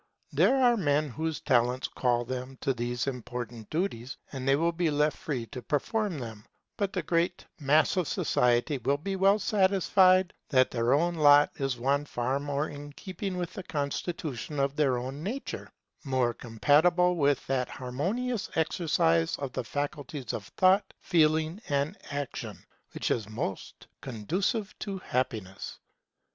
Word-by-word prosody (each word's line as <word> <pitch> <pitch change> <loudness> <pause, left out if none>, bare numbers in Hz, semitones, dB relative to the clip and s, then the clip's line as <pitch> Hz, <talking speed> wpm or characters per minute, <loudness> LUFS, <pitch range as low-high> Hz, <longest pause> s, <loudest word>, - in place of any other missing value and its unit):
There - - +4
are 245 -2 +5
men 150 -4 +1
whose 160 +4 -3
talents 125 +1 +2
call 120 -1 0
them 130 +1 -5
to 135 - +1
these 120 0 -2
important 120 -3 -5
duties, 150 -7 -2
and 135 -2 -5
they 135 - +5
will 165 +4 +2
be 170 -1 0
left 150 +1 +2
free 135 -9 -4
to 125 - -6
perform 200 - -1
them; 110 -5 -7 0.3
but 200 -2 -1
the - - -2
great 170 0 0
mass 150 +5 +3
of 180 -4 +1
society 125 +4 +1
will 140 +4 +1
be 195 +6 -3
well 195 +2 +4
satisfied 190 -2 +4 0.2
that 130 -2 +4
their 120 0 +1
own 170 +4 +1
lot 145 -2 +6
is 135 -2 -1
one 140 +4 +1
far 130 0 -1
more 145 +1 -1
in 145 0 -9
keeping 185 +3 -5
with 175 -1 -3
the - - -5
constitution 150 - -3
of 140 +2 0
our 130 -3 +1
nature; 195 - -5 0.3
more 130 -4 +1
compatible 160 +11 +3
with 145 -3 +2
that 130 -2 -1
harmonious 190 - -2
exercise 150 - +2
of 135 -3 -5
the - - -2
faculties 145 -3 -4
of 105 - -5
Thought, 190 +2 +4
Feeling, 160 +1 +2
and 145 +5 0
Action, 145 -2 -5 0.3
which - - -1
is 110 -3 -1
most 110 -3 -5 0.2
conducive 180 - -2
to 200 -2 -4
happiness. 120 - -3
145 Hz, 150 wpm, -29 LUFS, 125-175 Hz, 0.3 s, lot